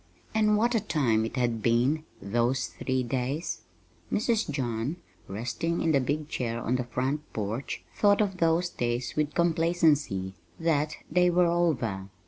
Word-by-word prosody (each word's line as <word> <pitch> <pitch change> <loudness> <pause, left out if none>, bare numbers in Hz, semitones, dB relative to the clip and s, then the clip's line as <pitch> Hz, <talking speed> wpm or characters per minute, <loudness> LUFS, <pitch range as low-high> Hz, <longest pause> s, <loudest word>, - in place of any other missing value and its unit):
And 215 -1 +3
what 235 +3 +2
a 230 - +3
time 130 - +1
it 115 - -5
had 120 -3 0
been 125 +8 +2
those 120 +5 0
three 130 -1 -2
days! 130 +6 -2 0.5
Mrs. 225 - +1
John, 125 0 -2 0.3
resting 120 - -2
in 165 - +2
the 140 - +4
big 145 +3 -1
chair 120 -5 -2
on 125 +2 0
the 125 - -2
front 135 +5 -2
porch, 110 +5 -3
thought 205 -1 +4
of 195 -3 +1
those 165 +1 +2
days 120 -4 -2
with 150 -1 0
complacency 160 - +2 0.3
that 155 -2 +1 0.2
they 180 +2 +4
were 175 0 +4
over. 125 - 0
145 Hz, 150 wpm, -28 LUFS, 120-170 Hz, 0.5 s, the